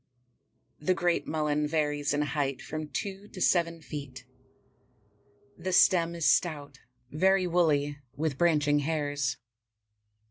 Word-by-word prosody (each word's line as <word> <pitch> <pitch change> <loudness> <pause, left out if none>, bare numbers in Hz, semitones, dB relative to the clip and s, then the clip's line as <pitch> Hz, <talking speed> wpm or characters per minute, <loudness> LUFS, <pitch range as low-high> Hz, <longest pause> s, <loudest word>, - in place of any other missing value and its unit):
The 180 +5 +1
Great 175 0 0
Mullen 150 -1 0
varies 150 -2 0
in 145 +1 +1
height 140 -2 -2
from 155 0 -6
two 195 +5 -5
to 190 - -11
seven 170 -2 +1
feet. 135 -5 -8 1.3
The 185 +2 -3
stem 170 -2 +4
is 165 -2 -2
stout, 145 -5 +1 0.3
very 190 +4 +3
woolly, 150 -5 +1 0.2
with 155 -1 -1
branching 150 -4 +3
hairs. 145 -3 -1
155 Hz, 115 wpm, -29 LUFS, 145-170 Hz, 1.3 s, stem